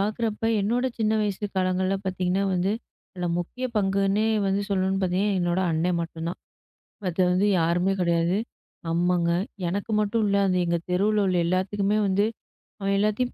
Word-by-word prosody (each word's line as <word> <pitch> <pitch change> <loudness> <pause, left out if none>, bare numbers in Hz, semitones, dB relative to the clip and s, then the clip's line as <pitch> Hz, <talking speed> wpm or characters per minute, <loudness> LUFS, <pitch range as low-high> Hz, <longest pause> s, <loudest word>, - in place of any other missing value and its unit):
பாக்குறப்ப 215 +2 -1 0.2
என்னோட 235 +5 0
சின்ன 220 0 +1
வயசு 205 0 -2
காலங்கள்ல 185 +1 +1
பார்த்தீங்கன்னா 185 +1 0
வந்து 185 +3 +1 0.4
அதுல 180 -2 -3
முக்கிய 250 +9 -5
பங்குன்னே 195 +1 +2 0.2
வந்து 195 +1 +1
சொல்லணும்னு 190 0 +1
பார்த்தீங்கன்னா 190 +2 +1
என்னோட 175 +1 +1
அண்ணன் 170 +2 +1
மட்டும்தான். 165 +1 -5 0.7
மத்த 180 0 -3
வந்து 190 +3 +2
யாருமே 175 +3 +2
கிடையாது. 170 +2 +2 0.5
அம்மாங்க 175 0 +2 0.4
எனக்கு 200 +5 -3
மட்டுமில்ல 210 -1 +1
அது 185 -1 +1
எங்க 170 0 +1
தெருவுல 210 +3 +2
உள்ள 180 -1 +1
எல்லாத்துக்குமே 195 +3 0
வந்து 195 +2 +2 0.5
அவன் 195 0 0
எல்லாத்தையும் 215 +4 0
190 Hz, 140 wpm, -25 LUFS, 180-205 Hz, 0.7 s, பங்குன்னே